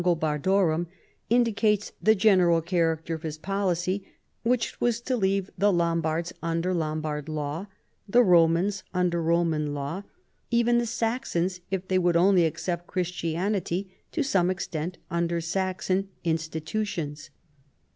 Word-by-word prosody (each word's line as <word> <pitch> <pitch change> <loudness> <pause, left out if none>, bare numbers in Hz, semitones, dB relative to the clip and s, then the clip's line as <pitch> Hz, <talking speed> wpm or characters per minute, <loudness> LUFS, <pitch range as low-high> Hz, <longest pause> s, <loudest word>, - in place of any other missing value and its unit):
317 160 -4 +1
gobardorum," 175 -4 +2 0.4
indicates 220 -3 +2
the 220 +1 +5
general 185 -5 +4
character 165 -1 0
of 160 - -5
his 155 -2 -5
policy, 190 +1 -1 0.4
which 235 0 0
was 235 -1 +2
to 255 +2 -1
leave 195 -3 0
the 205 +2 +4
Lombards 170 -1 0
under 165 +2 -1
Lom 155 -2 -1
bard 150 -1 -4
Jaw, 155 +4 -3 0.4
the 245 +4 +6
Romans 180 +1 +4
under 175 -2 +1
Roman 160 -3 +1
law; 145 +7 -3 0.5
even 235 0 +3
the 240 - -1
Saxons, 225 -6 -1
if 190 -1 -3
they 185 0 +2
would 175 -1 +3
only 180 0 +5
accept 175 +2 -4
Christianity, 180 +2 -2 0.2
to 320 - 0
some 185 -10 +2
extent 175 -2 -3
under 170 0 0
Saxon 185 +3 -1
institutions. 160 -1 -3
175 Hz, 130 wpm, -27 LUFS, 165-195 Hz, 0.5 s, the